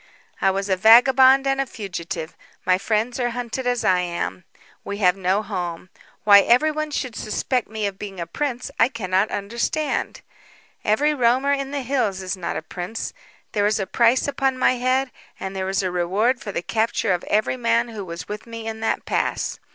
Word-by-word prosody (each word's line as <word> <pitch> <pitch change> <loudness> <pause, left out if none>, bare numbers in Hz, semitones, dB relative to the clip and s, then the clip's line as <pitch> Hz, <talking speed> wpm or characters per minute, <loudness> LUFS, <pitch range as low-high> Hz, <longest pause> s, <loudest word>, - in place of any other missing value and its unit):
"I 195 - +4
was 195 +1 -1
a 190 - +2
vagabond 260 +6 +6
and 270 0 +1
a 270 - -3
fugitive. 175 -6 -6 0.3
My 185 0 +3
friends 220 +4 -1
are 245 -1 +1
hunted 245 +1 -3
as 245 -1 0
I 185 -1 +4
am. 95 - -3 0.4
We 200 - -5
have 180 -3 +3
no 190 +2 0
home. 180 -4 -5 0.3
Why 200 -1 +8
everyone 305 +8 +2
should 255 -5 -3
suspect 245 +3 -1
me 215 -1 -3
of 195 -1 -4
being 195 -3 -7
a 170 - -3
prince 250 - -3
I 230 - +5
cannot 195 -4 0
understand. 235 +10 -2 0.6
Every 290 +9 +2
roamer 260 +1 +2
in 275 -1 -2
the 280 -1 -3
hills 225 -8 -1
is 185 +1 -3
not 180 -2 -4
a - - -5
prince. 185 +5 -5 0.4
There 205 -2 +2
is 215 +1 +1
a 195 - -1
price 235 +6 +3
upon 270 -2 0
my 255 - +4
head, 255 +1 +1 0.3
and 190 0 -5
there 190 0 -2
is 195 0 0
a 185 - -1
reward 195 +8 +1
for 205 - -5
the 175 - -3
capture 225 -1 0
of 175 - -2
every 215 +4 +1
man 235 0 +1
who 215 -3 -6
was 170 -2 -7
with 210 +2 -7
me 230 -1 -7
in 220 0 -5
the 225 - 0
pass. - - -1
220 Hz, 195 wpm, -22 LUFS, 190-250 Hz, 0.6 s, Why